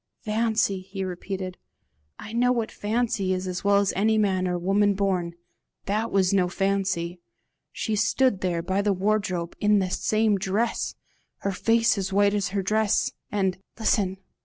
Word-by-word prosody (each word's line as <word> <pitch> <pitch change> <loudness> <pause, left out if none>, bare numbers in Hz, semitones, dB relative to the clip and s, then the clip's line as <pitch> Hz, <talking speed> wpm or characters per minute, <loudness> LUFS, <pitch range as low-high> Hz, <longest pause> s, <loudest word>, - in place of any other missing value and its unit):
"Fancy!" 220 -3 +1
he 195 +1 -6
repeated; 185 0 -5 0.6
"I 215 - -9
know 245 +1 +3
what 230 -3 -1
fancy 210 -3 -1
is 185 0 -4
as 180 -1 -4
well 200 0 +4
as 200 -1 +2
any 220 +3 +2
man 190 -3 +1
or 180 0 -1
woman 200 +3 +2
born: 185 -4 -1 0.5
THAT 215 +3 -1
was 190 -1 +2
no 185 -2 +3
fancy. 190 -2 -1 0.5
She 220 - -2
stood 220 0 +2
there, 175 -2 -1
by 190 +3 0
the 205 0 +2
wardrobe 190 -3 -1
in 210 0 +4
the 185 -2 0
same 215 0 +1
dress! 200 +5 -1 0.5
her 200 - -1
face 225 +3 +2
as 190 0 -3
white 200 +1 +3
as 205 -2 0
her 195 +1 -2
dress! 215 +2 +1 0.2
And 190 -3 0 0.2
listen! 200 -4 +1
200 Hz, 160 wpm, -25 LUFS, 185-215 Hz, 0.6 s, well